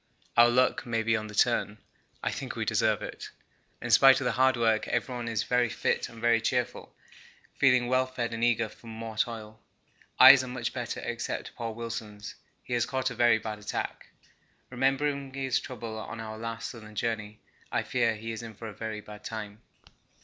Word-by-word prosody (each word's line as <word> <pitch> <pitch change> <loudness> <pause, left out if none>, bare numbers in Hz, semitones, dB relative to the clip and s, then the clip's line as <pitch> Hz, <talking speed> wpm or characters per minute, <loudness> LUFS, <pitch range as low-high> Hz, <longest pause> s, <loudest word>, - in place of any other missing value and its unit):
Our 120 0 +7
luck 125 +1 +2
may 115 -1 0
be 115 +1 +2
on 110 -1 -3
the 105 - -9
turn 110 -2 +2 0.5
I - - 0
think - - -5
we - - -2
deserve - - +1
it. - - -7 0.5
In - - -3
spite 135 0 +7
of 135 - -3
the - - +2
hard 130 0 +3
work 115 -2 +2
everyone 120 0 -2
is 115 -2 0
very 125 0 +2
fit - - -1
and 115 - -12
very 115 0 +3
cheerful, - - -2 0.6
feeling 125 -3 +4
well 130 +1 +2
fed 120 -2 -3
and 115 0 -3
eager 115 -1 +3
for 115 - -16
more 110 0 -7
toil. 110 -1 -3 0.6
Eyes 135 -2 +10
are - - -6
much 125 -1 -3
better - - -4
except - - -4
poor 115 -1 -4
Wilson's; 110 -3 -6 0.3
he 125 - -5
has 120 -1 +1
caught 130 0 -1
a - - -4
very 120 -1 +4
bad 110 -1 -6
attack. 105 - -4 0.6
Remembering 135 +1 0
his 135 -2 0
trouble 115 -3 -6
on 115 - -7
our 110 -1 -6
last 115 0 -4
Southern 110 -2 -12
journey, 105 -1 -3 0.3
I - - 0
fear 115 -3 +1
he 115 +1 -6
is 110 - -5
in 115 -2 -9
for 115 +2 -8
a 105 - -7
very 110 0 -5
bad 105 0 -12
time. 105 -1 -6
115 Hz, 195 wpm, -29 LUFS, 110-125 Hz, 0.6 s, Eyes